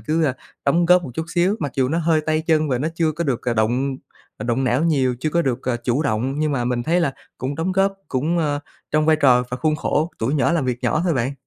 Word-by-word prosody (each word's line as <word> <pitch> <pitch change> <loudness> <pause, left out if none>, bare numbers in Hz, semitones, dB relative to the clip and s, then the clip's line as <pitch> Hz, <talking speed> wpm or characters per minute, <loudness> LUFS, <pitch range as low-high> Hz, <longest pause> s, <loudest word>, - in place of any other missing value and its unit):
cứ, 155 +8 0
a, 130 -3 +1 0.3
đóng 170 +5 +3
góp 180 +1 +5
một 135 - -7
chút 160 - -2
xíu. 185 +5 +2
Mặc 145 -4 -3
dù 130 -1 +1
nó 165 +3 0
hơi 160 -1 +2
tay 155 0 +1
chân 155 -2 +2
và 125 -2 0
nó 155 +5 -1
chưa 160 -2 +1
có 170 +2 -3
được, 130 -4 -1
ờ, 120 -2 -1
động, 125 +5 0 0.4
ờ, - - -6
động 120 +3 0
não 130 +6 +1
nhiều, 135 -6 +2
chưa 155 - -1
có 170 +1 +2
được, 130 -2 -1
ờ, 125 -2 -1
chủ 130 +5 +1
động, 135 +2 -1
nhưng 155 -1 0
mà 125 -3 -1
mình 120 0 -1
thấy 170 +6 +1
là 140 -6 +1 0.3
cũng 135 +2 -3
đóng 165 +5 -1
góp 195 +1 +2 0.2
cũng, 155 +7 0
ơ, 145 -2 0 0.3
trong 155 +1 +2
vai 160 -1 +5
trò 125 -4 +4
và 125 - -2
khuôn 155 +2 0
khổ 155 +3 0
tuổi 125 +7 0
nhỏ 150 +3 +2
làm 165 -5 +1
việc 125 -1 -1
nhỏ 125 +5 +1
thôi 170 - +1
bạn. 130 +1 0
145 Hz, 275 wpm, -21 LUFS, 125-160 Hz, 0.4 s, góp